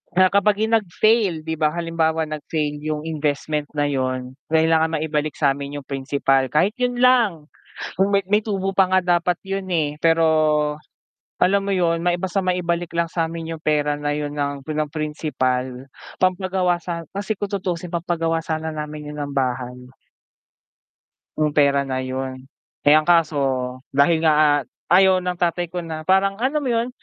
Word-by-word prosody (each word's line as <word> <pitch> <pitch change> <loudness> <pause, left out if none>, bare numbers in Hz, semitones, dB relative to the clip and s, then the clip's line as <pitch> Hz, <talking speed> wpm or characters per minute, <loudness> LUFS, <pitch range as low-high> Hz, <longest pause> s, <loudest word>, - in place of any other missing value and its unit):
na 185 0 +5
kapag 200 +1 +3
'yung 220 - -1
nag-fail, 205 -3 +1
'di 160 0 -3
ba, 155 - +3
halimbawa 165 -1 0
nag-fail 150 -1 -3
'yung 155 0 -3
investment 150 -1 -2
na 145 - +1
'yun, 130 -2 -2
kailangan 160 0 +2
maibalik 150 -1 -2
sa'min 140 0 -1
'yung 145 - -6
principal. 135 -1 +1
Kahit 160 - +2
'yun 250 0 0
lang, 220 -12 +3 0.5
kung 195 +2 +2
may 200 - +4
may 210 +1 +2
tubo 195 -2 -2
pa 190 - +6
nga 185 - +5 0.2
dapat 175 0 -1
'yun, 195 0 -4
eh, 150 -3 0
pero 165 0 +3 1.1
alam 195 +1 +3
mo 200 - -3
'yun, 170 -3 +1
may 175 0 +1
basta 190 +1 -1
maibalik 175 -2 -1
lang 170 0 0
sa'min 165 0 -3
'yung 160 - -11
pera 150 -1 +1
na 145 0 -3
'yun 145 0 -4
ng 140 -1 -3
pinam-principal, 150 -4 -2 0.3
pampagawa 185 -1 +1
sa 170 -2 -5
kasi 205 +1 -3
kung 205 -1 -3
tutusin 180 -3 -3
pampagawa 165 -1 -1
sana 160 -1 -3
namin 150 -1 -6
'yun 150 - -4
ng 145 - -4
bahay 125 -1 -2 1.6
'yung 150 -1 +1
pera 140 -1 +3
na 130 -1 -2
'yun. 130 0 -5 0.3
Eh 150 +1 +6
ang 155 - +1
kaso, 165 -4 +3 0.6
dahil 160 +4 +3
nga 150 -2 +4 0.2
ayaw 185 +1 +5
ng 180 -1 -3
tatay 175 0 0
ko 175 -1 -4
na 160 -1 -5
parang, 195 +3 +2
alam 275 +4 +1
mo 255 - -1
'yun, 230 +2 0
160 Hz, 160 wpm, -22 LUFS, 145-180 Hz, 1.6 s, pa